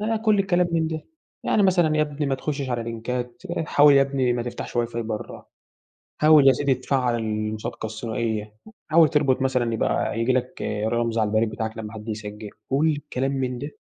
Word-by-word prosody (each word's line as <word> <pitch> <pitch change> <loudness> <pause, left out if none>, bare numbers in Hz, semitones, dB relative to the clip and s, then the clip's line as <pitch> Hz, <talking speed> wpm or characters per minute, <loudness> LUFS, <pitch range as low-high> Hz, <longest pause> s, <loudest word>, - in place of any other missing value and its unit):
ده 220 +2 0
كلّ 215 -2 +4
الكلام 180 -2 +2
من 165 -1 +1
ده، 160 -1 -4 0.4
يعني 210 - +2
مثلًا 175 -5 +3
يا 155 - +4
ابني 150 -1 -3
ما 135 - +1
تخشّش 140 -1 -3
على 120 -1 -1
لينكات 120 +2 -5 0.2
حاوِل 145 0 +6
يا 140 - +6
ابني 135 -2 0
ما 120 -1 -1
تفتَحش 120 0 -6
واي 120 -1 +2
فاي 115 0 -4
برَّه، 110 -1 -6 0.8
حاول 150 -2 +7
يا 135 - +8
سيدي 140 +1 +1
تفعّل 125 -1 0
المُصادقة 110 0 -3
الثنائية، 110 -1 -3 0.3
حاول 160 -1 +5
تربُط 140 -4 +2
مثلًا 125 -3 +1
يبقى 110 - 0
ييجي 120 +2 +2
لك 125 0 -2 0.3
رمز 115 0 0
على 110 -1 +2
البريد 110 +1 +1
بتاعك 110 +1 -4
لمّا 110 0 -6
حد 110 0 -9
يسجّل، 105 -1 -6 0.2
كلّ 140 +4 +2
الكلام 135 -3 -1
من 130 -2 -2
ده. 145 +2 -8
125 Hz, 190 wpm, -24 LUFS, 115-145 Hz, 0.8 s, يا